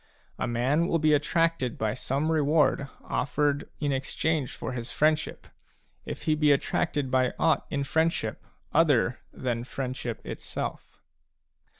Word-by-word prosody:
A - - 0
man 130 +8 +1
will 170 - +2
be 155 -1 +3
attracted 165 -4 +1
by 110 -1 0
some 140 +5 -1
reward 150 -2 +3 0.2
offered 145 0 0
in 145 -2 0
exchange 135 +2 -1
for - - -5
his 120 -1 -5
friendship, 155 0 +1 0.6
if - - -5
he 155 - +2
be 150 -1 +4
attracted 145 -1 0
by 130 -1 +2
aught 160 - +2
in 140 -1 -1
friendship 160 -6 0 0.3
other 145 -6 +3
than 120 -2 -2
friend 130 0 -4
ship 120 -3 -4
itself. - - -6
145 Hz, 135 wpm, -28 LUFS, 130-155 Hz, 0.6 s, be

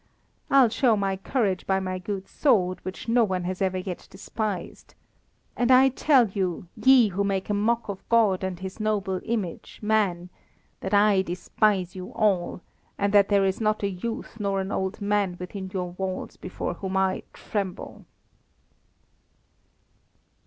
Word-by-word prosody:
I'll 270 -4 +6
show 230 -1 +2
my 195 -1 0
courage 195 -1 -1
by 190 0 +2
my 185 -1 -3
good 195 +1 -5
sword, 185 -10 +2
which 185 +5 -7
no 235 +1 +4
one 185 -4 -1
has 185 +1 -4
ever 190 -1 +1
yet 185 -1 -6
despised. 200 0 -5 0.6
And 245 0 +1
I 260 +1 +7
tell 265 -2 +4
you, 185 -3 -2
ye 260 -4 +5
who 200 +2 -1
make 195 0 -1
a - - +2
mock 225 +3 +1
of 200 -2 -7
God 215 -5 +3
and 185 -2 -3
His 190 +2 -7
noble 205 -3 -1
image, 210 -7 -4
man, 195 -5 +1 0.5
that 190 +2 -1
I 205 -1 +5
despise 185 +1 0
you 185 0 -7
all, 190 -5 0 0.4
and 200 0 0
that 200 -1 +5
there 200 -1 +4
is 190 +3 -1
not 215 -1 +1
a 200 - +1
youth 225 +4 -6
nor 200 -1 0
an 190 +1 -3
old 190 +2 -2
man 200 -3 0
within 190 +1 -6
your 180 -2 -3
walls 185 +1 -4
before 180 - -5
whom 190 +2 -3
I 190 -1 +1
tremble!" 195 -4 -5
195 Hz, 160 wpm, -26 LUFS, 185-215 Hz, 0.6 s, I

